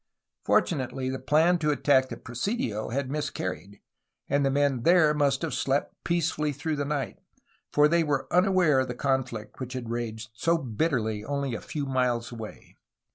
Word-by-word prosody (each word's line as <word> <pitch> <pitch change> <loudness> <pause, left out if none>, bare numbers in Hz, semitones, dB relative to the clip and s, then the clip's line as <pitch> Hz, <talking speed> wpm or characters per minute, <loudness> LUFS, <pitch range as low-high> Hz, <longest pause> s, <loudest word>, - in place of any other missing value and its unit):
Fortunately 130 -4 +1
the 130 - -4
plan 165 +4 +3
to 150 -2 +1
attack 130 -2 +3
the - - -6
presidio 120 - -3
had 130 +2 -2
miscar 145 -10 -2
ried, 95 +4 -12 0.5
and 140 0 +2
the 135 - +3
men 140 -2 +1
there 165 +1 +5
must 145 +1 +1
have 165 - -2
slept 135 +1 0
peacefully 165 -3 0
through 150 +2 -3
the 145 - -1
night, 145 -2 -3 0.5
for 150 0 +5
they 170 +2 +3
were 140 -3 0
unaware 180 -6 +4
of 130 - 0
the 125 - -4
conflict 125 -6 -2
which 130 -1 -5
had 120 -3 -5
raged 110 -2 -4
so 165 +9 +1
bitterly 115 -5 -1
only 140 +1 -2
a - - -4
few 145 -2 -4
miles 125 -3 0
away. 110 -2 -9
135 Hz, 175 wpm, -27 LUFS, 120-150 Hz, 0.5 s, there